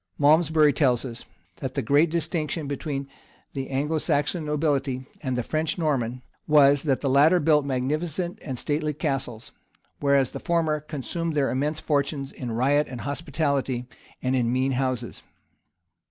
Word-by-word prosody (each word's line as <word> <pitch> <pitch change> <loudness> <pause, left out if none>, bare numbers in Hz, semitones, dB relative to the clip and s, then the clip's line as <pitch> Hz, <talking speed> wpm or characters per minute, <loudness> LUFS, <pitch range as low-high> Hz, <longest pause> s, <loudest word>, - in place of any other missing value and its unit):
[] - - -45
Malmsbury 155 0 +5
tells 130 -4 +2
us,[] 120 -3 -7 0.3
that - - -5
the - - 0
great 145 +8 +4
distinction 160 -1 -2
between 140 -1 -4 0.5
the 135 -1 -4
Anglo 150 +4 0
Saxon 150 +2 0
nobility 145 -4 -1 0.2
and 130 -4 -2
the 125 - 0
French 155 +4 -1
and - - -9
Norman, 125 -5 -1 0.2
was, 145 -2 +6
that 140 -5 0
the 140 - -1
latter 145 +7 +5
built 150 -2 +3
magnificent 155 +7 -2
and 130 -3 -5
stately 150 +3 -1
castles; 135 -7 -3 0.5
whereas 140 -3 +3
the - - -6
former 160 -3 +1
consumed 155 +2 -4
their 140 -2 +2
immense 150 +4 -1
fortunes 140 -2 -1
in 125 -3 -6
riot 140 +6 +2
and 125 -2 -7
hospitality, 140 -4 -1 0.4
and 130 +1 +1
in 120 -2 +1
mean 130 +2 +1
houses. 130 -2 -2
145 Hz, 155 wpm, -25 LUFS, 130-155 Hz, 0.5 s, was